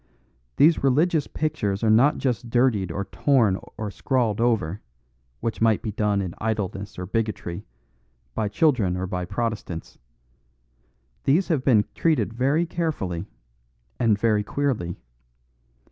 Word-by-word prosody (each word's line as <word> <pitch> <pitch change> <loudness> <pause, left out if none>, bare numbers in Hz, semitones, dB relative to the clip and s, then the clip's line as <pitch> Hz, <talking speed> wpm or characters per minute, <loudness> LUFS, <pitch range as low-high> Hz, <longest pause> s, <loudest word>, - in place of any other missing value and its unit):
These 155 +1 +4
religious 150 +3 +2
pictures 115 -11 -2
are 110 - +3
not 130 +7 +5
just 125 -2 -2
dirtied 115 -6 +2
or 100 +3 -3
torn 115 -9 +2 0.2
or 105 -2 -4
scrawled 115 -2 0
over, 110 -6 +1 0.6
which 115 - -3
might 110 -2 +3
be 110 - -2
done 105 -1 0
in 90 -2 -5
idleness 100 -3 -3
or 90 - -4
bigotry, 105 -4 -3 0.7
by 105 - -1
children 105 - +2
or 95 - -2
by 90 -1 -3
Protestants. 100 -4 -4 1.3
These 160 +8 +3
have 150 -6 +1
been 110 -7 +4
treated 160 -8 +1
very 140 +8 +1
carefully 120 - -3 0.7
and 115 -4 +3
very 105 -1 +2
queerly. 115 -10 -2
110 Hz, 130 wpm, -24 LUFS, 100-135 Hz, 1.3 s, not